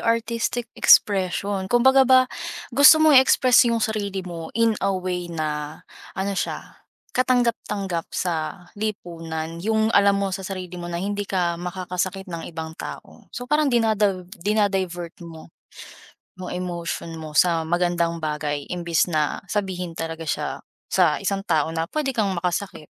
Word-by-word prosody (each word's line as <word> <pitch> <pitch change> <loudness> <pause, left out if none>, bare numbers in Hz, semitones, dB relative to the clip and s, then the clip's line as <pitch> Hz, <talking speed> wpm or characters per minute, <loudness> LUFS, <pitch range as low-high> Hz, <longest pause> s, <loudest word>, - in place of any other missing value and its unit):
aristic 230 +1 -1
expression. 195 0 +3
Kumbaga, 265 +5 +5
ba 260 0 +6 0.5
gusto 285 +5 +7
mo 315 - +6
i-express 255 -1 +6
yung 230 - 0
sarili 205 -3 -2
mo 170 -3 -8
in 230 -2 +2
a 195 - +2
way 180 -2 -3
na 150 -1 -4 0.3
ano 195 +1 -2
siya - - -5 0.3
katanggap-tanggap 230 -8 0
sa 175 +1 -3
lipunan, 165 -5 -5
yung 220 +1 +2
alam 200 0 +5
mo 195 -2 -1
sa 195 - -5
sarili 185 -2 -6
mo 175 0 -6
na 170 - -3
hindi 205 +2 -2
ka 180 -3 -1
makakasakit 185 +1 -3
ng 170 -2 -6
ibang 160 -1 -6
tao. - - -10
So, 245 - -7
parang 300 0 +2
dinadav 210 -6 +1
dina-divert 190 -3 -1
mo 165 -2 -10 0.9
mo 185 -1 -8
emotion 170 -2 -4
mo 155 -1 -8
sa 170 -2 +4
magandang 170 0 0
bagay 150 -2 -3
imbis 170 -2 0
na 155 -4 0
sabihin 185 -4 -3
talaga 165 0 -5
siya - - -2 0.4
sa 175 -4 +2
isang 195 0 -2
tao 155 0 +2
na 165 0 -1
pwede 300 +4 -2
kang 210 -6 0
makasakit. 175 -2 -3
185 Hz, 145 wpm, -23 LUFS, 170-210 Hz, 0.9 s, gusto